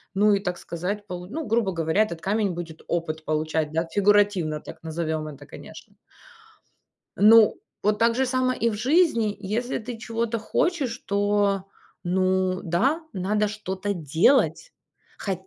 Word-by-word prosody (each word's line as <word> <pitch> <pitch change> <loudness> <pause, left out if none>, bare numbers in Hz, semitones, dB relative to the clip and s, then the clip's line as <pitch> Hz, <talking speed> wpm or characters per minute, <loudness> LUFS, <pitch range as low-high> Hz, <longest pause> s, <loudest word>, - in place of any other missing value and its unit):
Ну 205 +1 +4
и, 200 - +2
так 180 -3 -3
сказать, 190 +5 -4
полу 180 0 -6 0.2
грубо 220 -3 +1
говоря, 165 +4 +1
этот 170 -6 -6
камень 205 +1 0
будет 165 -2 -7
опыт 160 -2 -3
получать, 155 0 -1
да, 165 +1 0
фигуративно 200 -4 +2
так - - -11
назовем 160 -1 -3
это, 145 -1 -10
конечно. - - -12 1.2
Ну, 220 +1 +6 0.2
вот 210 0 +1
так 230 0 +3
же 265 +1 +2
само 255 0 +1
и 235 -2 0
в - - -4
жизни. 235 - +2
Если 215 +5 -2
ты 235 0 -7
чего-то 230 0 -2
хочешь, 270 +1 -1
то, 200 -1 +1 0.4
ну 185 0 +1
да, 250 - +1
надо 210 +2 0
что-то 205 -1 -4
делать. 175 - +2 0.5
Хо 195 - -2
200 Hz, 145 wpm, -25 LUFS, 170-225 Hz, 1.2 s, Ну